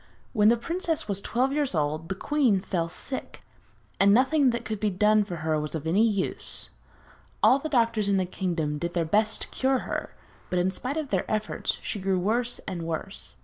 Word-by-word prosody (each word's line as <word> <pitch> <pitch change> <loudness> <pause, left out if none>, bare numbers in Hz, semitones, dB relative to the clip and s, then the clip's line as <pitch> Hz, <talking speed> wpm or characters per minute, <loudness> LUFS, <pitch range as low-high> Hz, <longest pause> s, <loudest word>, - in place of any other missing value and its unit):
When 210 -3 +4
the 235 - +4
princess 335 - -2
was 200 -1 -1
twelve 255 +6 0
years 290 -8 0
old 155 +2 -1
the 195 - -2
queen 255 -3 +2
fell 170 -3 -2
sick, 260 +9 -6 0.6
and 200 +1 +6
nothing 265 +5 +4
that 235 -1 -2
could 215 -2 -3
be 215 - +1
done 210 +2 +3
for 185 -4 -6
her 155 -1 +1
was 150 +1 -4
of 160 - -4
any 185 +7 +3
use. 200 -4 -3 0.7
All 270 - +6
the 315 - -4
doctors 230 -6 +2
in 200 - +3
the 185 - +1
kingdom 165 -5 -2
did 170 +3 -3
their 170 -2 +1
best 215 +6 +1
to - - -7
cure 265 0 +1
her, - - -4 0.3
but 180 - -1
in 180 +1 +2
spite 255 +9 -3
of 305 -3 -3
their 190 -3 0
efforts 215 0 -1
she 205 - -3
grew 190 0 +1
worse 235 +6 0
and 185 -4 -3
worse. 165 +4 -4
205 Hz, 205 wpm, -27 LUFS, 180-245 Hz, 0.7 s, and